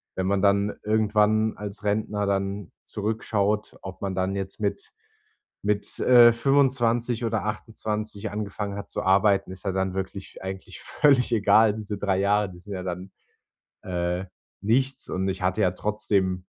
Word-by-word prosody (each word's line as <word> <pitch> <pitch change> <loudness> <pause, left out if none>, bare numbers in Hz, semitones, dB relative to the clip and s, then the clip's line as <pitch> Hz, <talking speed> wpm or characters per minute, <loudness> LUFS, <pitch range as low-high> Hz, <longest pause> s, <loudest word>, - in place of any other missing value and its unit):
wenn 95 - -1
man 100 0 +1
dann 100 +1 +2
irgendwann 110 0 +2
als 105 0 -7
Rentner 105 0 0
dann 100 -1 -2
zurückschaut, 105 0 -1
ob 95 -1 -8
man 95 -1 -2
dann 95 +1 -1
jetzt 95 +1 -5
mit 100 - -2 0.7
mit, 100 0 -1
äh, 120 -2 +7
25 120 -2 +2
oder 110 -1 -1
28 105 0 -4
angefangen 105 -1 -4
hat 100 - -7
zu - - -3
arbeiten, 100 0 +3
ist 95 +1 -9
ja 95 - 0
dann 95 -1 -1
wirklich 95 0 -6
eigentlich 95 0 -7
völlig 135 -5 +3
egal. 110 0 +5
Diese 105 -1 -5
3 95 -1 0
Jahre, 100 0 +2
die 90 - -13
sind 100 +2 -9
ja 90 - -4
dann, 90 +1 -5 0.7
äh, 90 0 -2 0.4
nichts. 130 +5 0
Und 95 +1 -1
ich 95 - -4
hatte 90 0 0
ja 90 - +3
trotzdem 95 -2 -1
100 Hz, 155 wpm, -25 LUFS, 95-110 Hz, 0.7 s, äh